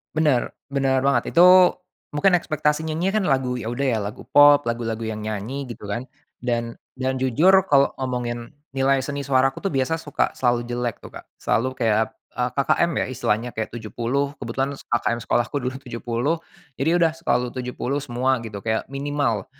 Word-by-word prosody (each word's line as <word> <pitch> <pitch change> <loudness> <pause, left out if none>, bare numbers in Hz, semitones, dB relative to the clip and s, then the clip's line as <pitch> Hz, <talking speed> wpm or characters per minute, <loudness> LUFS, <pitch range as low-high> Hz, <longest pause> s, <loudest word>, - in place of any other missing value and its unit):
Benar, 150 -6 +2 0.2
benar 135 -1 +1
banget. 135 -4 +1
Itu 180 +1 +7 0.4
mungkin 185 +6 +4
ekspektasi 155 -1 -1
nyanyinya 180 +7 0
kan - - -1
lagu 130 -3 +1
ya 110 - -5
udah 120 +4 -2
ya 120 -5 +1
lagu 105 +3 -6
pop, 145 0 +7
lagu-lagu 115 -2 -3
yang 110 -1 -4
nyanyi 110 +6 -4
gitu 120 - -9
kan, 120 +5 -3 0.3
dan 120 -1 -2 0.2
dan 130 0 -2
jujur 130 +8 +4 0.2
kalau 140 -1 +4
ngomongin 120 -2 -3 0.2
nilai 135 0 +2
seni 140 0 -4
suaraku 135 0 +2
tuh 195 - -2
biasa 135 +5 0
suka 145 -3 -1
selalu 120 -1 +1
jelek 120 -2 -2
tu - - -10
Kak, - - -11
selalu 125 +5 0
kayak, 110 -2 +1 0.2
eee, 125 +1 -1
KKM 155 +5 +2
ya - - -2
istilahnya, 120 -1 -1
kayak 110 -1 -4
70, 120 +5 -2
kebetulan 135 +3 -2
KKM 120 0 -1
sekolahku 120 +4 0
dulu 125 0 -3
70, 120 +5 -2 0.4
jadi 160 +6 +2
udah 170 -2 +3
selalu 125 -7 0
70 125 +2 -3
semua 130 -1 0
gitu, 105 -4 -8
kayak 110 0 -1
minimal. 140 -5 -1
130 Hz, 170 wpm, -23 LUFS, 120-140 Hz, 0.4 s, Itu